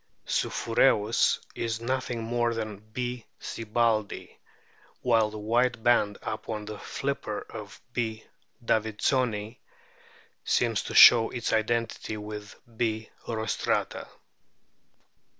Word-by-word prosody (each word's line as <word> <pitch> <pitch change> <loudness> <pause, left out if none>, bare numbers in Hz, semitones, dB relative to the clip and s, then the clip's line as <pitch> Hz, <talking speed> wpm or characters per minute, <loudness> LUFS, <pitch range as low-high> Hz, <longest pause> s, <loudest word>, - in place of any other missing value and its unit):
supkureus 115 -2 +2
is 115 -1 -2
nothing 125 -1 -2
more 120 0 0
than 110 -3 -4
B. 125 0 -3 0.2
sibbaldii, 110 -1 -1 0.7
while 115 -3 +3
the 110 - -8
white 115 +2 +1
band 105 -4 +3
upon 110 -1 -4
the 105 0 -7
flipper 135 -6 -3
of 105 -2 -9
B. 110 -2 -2 0.4
davidsoni 110 +1 0 0.8
seems - - +1
to - - -6
show 115 -2 +9
its 120 -2 -2
identity 110 0 -1
with 105 0 -7 0.2
B. 110 -1 -1 0.2
rostrata. 110 -1 -1
115 Hz, 95 wpm, -28 LUFS, 110-120 Hz, 0.8 s, show